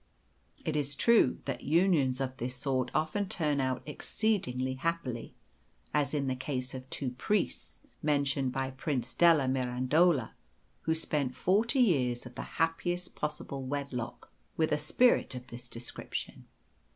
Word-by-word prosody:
It 155 - -1
is 145 -1 0
true 230 - +4
that - - -3
unions 150 -5 +3
of 130 -1 -2
this 125 +2 -3
sort 130 -1 0
often 185 +6 0
turn 150 -4 +1
out 130 -1 -1
exceedingly 150 - -1
happily, 130 -4 -3 0.6
as 145 -3 +2
in 145 -2 0
the 130 -1 0
case 130 -1 -3
of 130 0 -8
two 130 -2 -2
priests, 195 +10 -2 0.2
mentioned 140 -3 +1
by 135 0 -2
Prince 130 -2 -2
della 165 -6 +5
Mirandola, 130 +3 +2 0.5
who 160 - +1
spent 145 -5 0
forty 225 +8 +3
years 130 - +2
of 125 - -9
the - - -5 0.2
happiest 175 +2 0
possible 150 -2 -4
wedlock 140 -4 -4 0.3
with 160 -1 +2
a 150 - +2
spirit 195 - +3
of 125 0 -7
this 120 0 -9
description. 115 +1 -6
140 Hz, 140 wpm, -31 LUFS, 130-160 Hz, 0.6 s, della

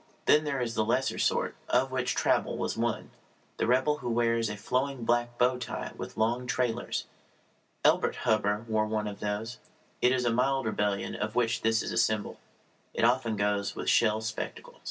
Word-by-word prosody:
Then 150 +1 +5
there 140 -2 -1
is 120 -2 -2
the 110 - +1
lesser 125 +4 0
sort, - - +1 0.2
of 130 +2 +2
which 130 -1 -1
Traubel - - +1
was - - -2
one - - -2 0.5
the - - 0
rebel 130 +5 +3
who 120 - -4
wears 115 -1 +1
a 105 - -5
flowing 130 +3 -1
black 120 0 +1
bow 125 +1 +2
tie 125 - -5
with - - -8
long 120 +3 0
trailers. 120 0 -1 0.8
Elbert - - +3
Hubbard 105 -1 +1
wore 110 -1 +1
one 110 -1 -1
of 100 -1 -6
these. 105 +4 -3 0.4
It 125 - +5
is 130 -1 +1
a 120 - +3
mild 135 +1 +1
rebellion 105 -2 -1
of 105 +1 -3
which 115 -2 +1
this 115 0 +2
is 115 - +2
symbol. 110 -2 -2 0.6
It - - +2
often 120 -2 +2
goes 100 0 0
with - - 0
shell 110 -1 +3
spectacles. 110 0 -5
115 Hz, 180 wpm, -29 LUFS, 110-125 Hz, 0.8 s, Then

